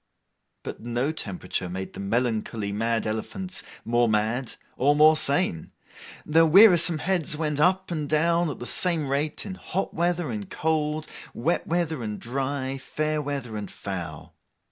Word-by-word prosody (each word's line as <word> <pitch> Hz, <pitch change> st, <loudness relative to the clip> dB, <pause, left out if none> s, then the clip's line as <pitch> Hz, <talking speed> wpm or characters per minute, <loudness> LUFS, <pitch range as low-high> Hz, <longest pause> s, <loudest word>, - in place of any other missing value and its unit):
But -, -, -7 dB
no 120 Hz, +5 st, -1 dB
temperature 95 Hz, -, -3 dB
made 95 Hz, +1 st, -6 dB
the -, -, -9 dB
melancholy 110 Hz, 0 st, -1 dB
mad 115 Hz, +2 st, -1 dB
elephants 185 Hz, -, -2 dB, 0.2 s
more 120 Hz, 0 st, +2 dB
mad 110 Hz, +4 st, 0 dB, 0.2 s
or 145 Hz, +3 st, +3 dB
more 155 Hz, +1 st, +6 dB
sane. 140 Hz, -, 0 dB, 0.5 s
Their 165 Hz, +2 st, +4 dB
wearisome 175 Hz, -2 st, +7 dB
heads 165 Hz, -3 st, 0 dB
went 150 Hz, -2 st, -1 dB
up 185 Hz, +4 st, +2 dB
and 150 Hz, -4 st, -3 dB
down 170 Hz, +2 st, +2 dB
at 145 Hz, -, -5 dB
the 120 Hz, -, -7 dB
same 165 Hz, 0 st, +2 dB
rate, 145 Hz, +3 st, -1 dB
in 195 Hz, -, -5 dB
hot 190 Hz, 0 st, -4 dB
weather 175 Hz, -3 st, 0 dB
and 105 Hz, -3 st, -5 dB
cold, 155 Hz, -1 st, -1 dB, 0.3 s
wet 160 Hz, +9 st, -1 dB
weather 165 Hz, -4 st, -1 dB
and 105 Hz, -2 st, -4 dB
dry, 135 Hz, +2 st, -3 dB
fair 155 Hz, +3 st, -2 dB
weather 135 Hz, -6 st, -4 dB
and 105 Hz, -1 st, -5 dB
foul. 90 Hz, -6 st, -7 dB
145 Hz, 150 wpm, -25 LUFS, 115-160 Hz, 0.5 s, wearisome